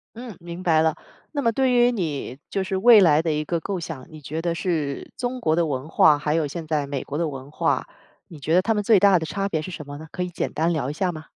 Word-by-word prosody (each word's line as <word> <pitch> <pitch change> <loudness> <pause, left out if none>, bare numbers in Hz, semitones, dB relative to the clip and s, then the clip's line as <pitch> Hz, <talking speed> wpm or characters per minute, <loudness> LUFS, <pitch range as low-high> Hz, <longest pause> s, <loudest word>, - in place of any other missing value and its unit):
嗯， 235 -4 -8
明 170 +1 -7
白 160 -3 +3
了。 160 -1 +2 0.4
那 290 - -2
么 230 -3 +1
对 260 +2 +2
于 245 0 +5
你， 155 - -3
就 195 - -1
是 190 - -2
未 220 +3 +7
来 155 -5 +5
的 165 -1 -1
一 150 0 -1
个 170 +1 -2
构 195 0 -3
想， 160 -6 -7
你 155 - -10
觉 150 +3 -5
得 170 0 -1
是 160 -5 -2
中 250 +1 -3
国 160 -9 +1
的 170 0 +2
文 140 -1 -3
化， 155 -2 +5
还 150 0 -1
有 160 -1 +1
现 160 +3 -6
在 150 -2 0
美 140 -2 -3
国 145 - -5
的 165 -1 0
文 135 0 -8
化， - - 0 0.4
你 165 - -12
觉 150 +3 -2
得 180 - +5
他 225 +3 +1
们 210 - -1
最 205 -2 +5
大 200 -2 +6
的 160 - -4
差 195 +5 -2
别 160 -5 -1
是 185 - -7
什 150 -4 -8
么 145 0 -7
呢？ 160 - -10
可 180 - -5
以 180 - -4
简 175 - -3
单 165 +3 0
聊 140 -4 -2
一 - - -3
下 180 +2 -1
吗？ 155 0 -9
165 Hz, 305 characters per minute, -23 LUFS, 150-190 Hz, 0.4 s, 未